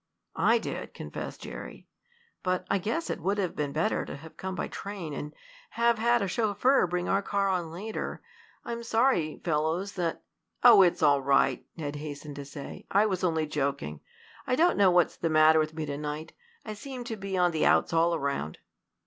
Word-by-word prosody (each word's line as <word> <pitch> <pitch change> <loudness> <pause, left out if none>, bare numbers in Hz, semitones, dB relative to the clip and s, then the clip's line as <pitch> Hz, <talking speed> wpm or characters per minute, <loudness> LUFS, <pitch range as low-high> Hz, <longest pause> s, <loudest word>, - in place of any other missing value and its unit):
"I - - +4
did," - - -5
confessed - - -7
Jerry. - - -9 0.5
"But 185 0 -1
I 200 - +2
guess 230 - -2
it - - -4
would 195 +5 0
have 185 -4 -1
been 145 -2 -2
better 155 +3 0
to - - -7
have 160 +2 -13
come 190 0 -5
by - - -2
train, 195 -6 -6
and 150 +1 -5 0.4
have 235 -1 +2
had 235 0 +3
a - - -1
chauffeur 215 +4 +2
bring 175 0 -2
our 195 - +2
car 200 0 0
on 180 -3 -1
later. 200 +7 -5 0.5
I'm 235 0 -4
sorry, 230 - +1
fellows, 165 +4 0
that 175 -4 -3 0.2
" - - -32
"Oh, 230 -5 +9
it's 175 -3 +3
all 145 -2 +5
right," 135 +1 +2
Ned 145 -2 -4
hastened 145 -1 -7
to 140 - -6
say. 140 0 -9
"I 200 +2 +4
was 190 -3 -1
only 160 -3 +1
joking. 135 - -2 0.5
I 255 - +2
don't 345 +5 +4
know 200 -2 +5
what's 175 -1 +3
the 165 - -1
matter 155 0 +6
with 155 0 -1
me 160 -1 -3
to 145 -1 -4
night. 150 +1 -5 0.3
I 215 - -5
seem 255 +4 -7
to 235 -2 -4
be 195 -2 -4
on 180 -1 +3
the 160 - +2
outs - - +3
all 165 +1 +3
around." 140 - -2
175 Hz, 200 wpm, -28 LUFS, 155-205 Hz, 0.5 s, Oh